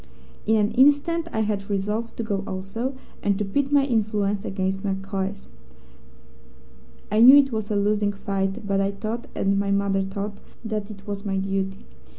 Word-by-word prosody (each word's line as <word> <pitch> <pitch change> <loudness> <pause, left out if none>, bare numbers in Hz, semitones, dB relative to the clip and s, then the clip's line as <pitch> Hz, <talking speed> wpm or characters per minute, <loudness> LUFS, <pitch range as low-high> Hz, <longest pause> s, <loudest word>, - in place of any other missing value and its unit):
In 220 - +4
an 210 -1 +2
instant 290 +5 +3
I 220 - 0
had 205 -2 -2
resolved 210 +3 -2
to 230 - -2
go 200 -3 -2
also, 195 +8 -4 0.3
and 200 -1 +1
to 210 - -1
pit 275 +8 -1
my 285 -1 +4
influence 210 -5 0
against 190 0 -2
MacCoy's. 195 0 -3 1.6
I 215 +1 +3
knew 255 +4 +10
it 275 -2 +4
was 220 -2 -3
a 210 - 0
losing 205 0 +2
fight, 200 +1 -2
but 195 -1 +1
I 195 - +1
thought, 220 +4 -4
and 195 0 +1
my 200 0 0
mother 200 -1 +1
thought, 200 +1 -4 0.3
that 215 -2 -3
it 200 -2 -11
was 200 -1 -5
my 195 -2 -1
duty. 195 0 -2
205 Hz, 170 wpm, -24 LUFS, 195-220 Hz, 1.6 s, knew